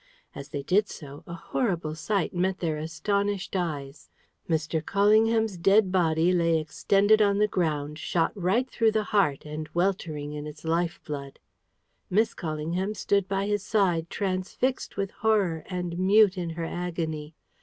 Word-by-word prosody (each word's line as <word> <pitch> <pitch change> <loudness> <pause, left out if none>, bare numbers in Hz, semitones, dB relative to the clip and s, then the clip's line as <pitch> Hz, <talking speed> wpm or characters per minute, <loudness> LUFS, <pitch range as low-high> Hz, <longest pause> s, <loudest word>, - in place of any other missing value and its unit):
As 140 +1 -9
they 145 -1 -4
did 200 +7 +2
so, 145 -1 -10
a 170 - -6
horrible 170 -4 -2
sight 185 +5 -1
met 185 +1 0
their 160 -4 -2
astonished 200 +6 -2
eyes. 150 -6 -4 0.4
Mr. 160 0 0
Callingham's 215 +2 +3
dead 195 +2 +4
body 170 -1 +2
lay 170 -2 +3
extended 200 +7 +3
on 200 -1 +3
the 210 +1 +3
ground, 150 -5 -1
shot 165 -2 0
right 200 +7 +1
through 225 -3 +1
the 215 -1 +1
heart, 155 -10 +2
and 150 +1 -6
weltering 165 -5 -1
in 150 0 -5
its 150 +1 -10
life 165 +1 0
blood. 140 -2 -6 0.7
Miss 220 +4 +2
Callingham 170 +5 -3
stood 200 -2 +1
by 195 0 -1
his 205 0 0
side, 180 -6 +1
transfixed 195 +8 -2
with 195 0 -2
horror, 195 -8 +1
and 180 -2 -4
mute 200 +1 +5
in 175 -2 -3
her 165 - -2
agony. 165 -3 -4
180 Hz, 155 wpm, -27 LUFS, 160-200 Hz, 0.7 s, mute